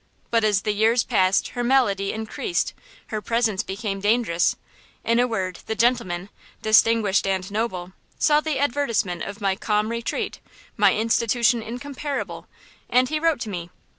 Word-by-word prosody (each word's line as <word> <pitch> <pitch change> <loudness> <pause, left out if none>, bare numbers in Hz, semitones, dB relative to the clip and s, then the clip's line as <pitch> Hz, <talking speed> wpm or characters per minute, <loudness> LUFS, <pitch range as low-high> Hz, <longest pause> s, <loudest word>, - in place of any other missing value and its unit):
But 230 -1 +3
as 205 -2 +2
the 215 - +1
years 225 +3 +3
passed 190 -5 +2
her 245 - -3
malady 235 -6 +2
increased; 220 - -2 0.4
her 215 -1 -3
presence 230 -3 +1
became 195 0 -4
dangerous; 205 -5 +2 0.5
in 230 +1 +2
a 245 - +3
word, 185 -6 -3
the 220 - -2
gentleman, 205 -6 0 0.3
distinguished 215 -2 +4
and 190 0 -1
noble, 190 -5 -3 0.2
saw 300 -1 +4
the 310 -3 -2
advertisement 235 -10 0
of 200 +2 -6
my 195 -1 +1
'Calm 210 +1 0
Retreat,' 235 0 -3 0.4
my - - +4
institution 230 +1 +2
incomparable, 275 +5 -5 0.4
and 250 +1 +3
he 310 - -1
wrote 325 -5 +1
to 220 - -4
me. 175 -3 -5
220 Hz, 150 wpm, -23 LUFS, 195-245 Hz, 0.5 s, distinguished